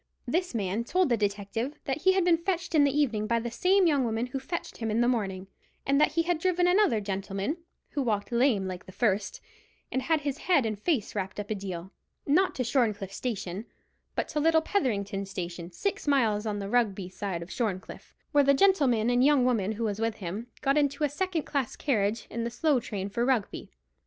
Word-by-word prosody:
This 350 +2 -1
man 205 +1 -1
told 360 +6 +1
the 240 - +4
detective 210 +6 -2
that 275 +3 -2
he 375 - +5
had 375 -2 +2
been 335 -2 +4
fetched 345 -1 -2
in 300 -2 +6
the 280 +1 +1
evening 225 -7 +1
by 235 +1 +2
the 235 0 -4
same 370 +9 +3
young 290 -5 +3
woman 225 0 -1
who 250 +2 -4
fetched 335 +6 -5
him 225 -1 -3
in 215 +2 +1
the 240 - +3
morning, 195 -6 -1 0.4
and 275 +1 +3
that - - +3
he 330 +1 +2
had 340 -1 0
driven 360 0 +2
another 360 - +4
gentleman, 195 - -3 0.3
who 285 - -1
walked 215 -3 -1
lame 235 -5 +3
like 185 -1 -7
the - - -9
first, 205 -1 0 0.5
and 260 - 0
had 320 +1 +1
his 285 0 -3
head 335 -9 +3
and 215 -2 -2
face 270 - 0
wrapped 195 0 -4
up 205 +1 -5
a - - +3
deal, 190 -2 -6 0.3
not 365 +7 +3
to 255 - -1
Shorncliffe 220 -6 0
station, 205 -4 -4 0.5
but - - -1
to 300 - -1
little 320 +1 +4
Petherington 200 - -1
station, 175 -2 -6
six 395 - -3
miles 225 -7 +2
on 210 -1 -1
the 200 -1 -4
Rugby 205 -5 +1
side 185 -2 -4
of 170 - -12
Shorncliffe, 200 -6 -4 0.2
where 290 -2 +5
the 280 0 +5
gentleman 270 - +3
and 245 0 +3
the - - +5
young 285 -4 +4
woman 220 -5 +1
who 225 +2 -4
was 210 -2 -1
with 225 -1 0
him 200 +5 -5
got 275 +1 +3
into 285 +1 0
a 295 - +3
second 335 +2 -1
class 275 -5 -2
carriage 215 -5 0
in 230 +1 -3
the 235 - -1
slow 280 +3 +2
train 200 -4 -4
for 220 +4 -1
Rugby. 245 -5 -1
235 Hz, 215 wpm, -28 LUFS, 205-295 Hz, 0.5 s, in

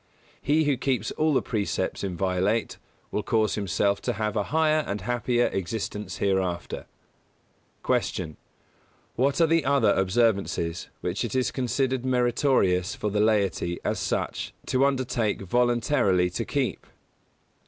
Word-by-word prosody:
He 155 +2 +2
who 145 -3 +1
keeps 125 -5 -1
all 155 0 +1
the - - +2
precepts 105 -3 -2
inviolate 95 +3 -1 0.3
will 105 - -1
cause 110 -1 +1
himself 100 0 0
to 120 - -1
have 110 +1 -2
a 105 -2 0
higher 155 0 +3
and 100 0 -3
happier 120 +2 +1
existence 100 0 -4
hereafter. 95 -3 -1 1.0
157. 80 - 0
Q. 115 - -10
_What 140 +2 +2
are 165 - +6
the 165 -1 +3
other 140 +1 +3
observances 95 -4 0
which 90 +5 -2
it 120 - -3
is 130 -1 +1
considered 130 0 -1
meritorious 120 -7 +2
for 105 - -2
the 105 +1 +1
laity 100 -5 +1
as - - 0
such - - -2
to 130 +1 +2
undertake 125 -7 -1
voluntarily 120 -4 +2
to - - -3
keep? - - -2
110 Hz, 135 wpm, -26 LUFS, 95-130 Hz, 1.0 s, are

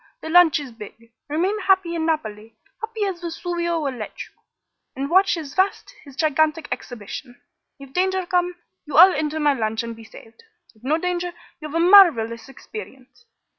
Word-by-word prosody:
The 320 - -6
launch 345 -3 +6
is 280 -4 -8
big. 230 +1 -13 0.2
Remain 365 +8 0
happy 380 -4 +2
in 325 -1 -2
Naples 220 -8 -3 0.3
happy 445 -1 -3
as 375 -3 -4
Vesuvio 345 0 -3
will 280 -4 -2
let 225 -4 -7
you - - -18 0.6
and 275 +3 -4
watch 380 +1 +4
his 300 -4 -7
vast, 400 +6 0
his 280 -3 -14
gigantic 310 +1 +1
exhibition. 245 +2 -7 0.4
If 275 -1 -13
danger 375 0 0
come, 355 0 0 0.3
you 295 - -2
all 365 +3 +9
enter 305 +1 -2
my 295 -1 +3
launch 220 -3 -2
and 230 0 -6
be 225 - -13
saved. 225 - -16 0.3
If 220 0 -27
no 295 +5 +1
danger, 355 0 -3 0.3
you 305 - -7
have 305 - -8
a - - +2
marvelous 290 - +5
experience." 265 - -12
315 Hz, 175 wpm, -22 LUFS, 250-355 Hz, 0.6 s, all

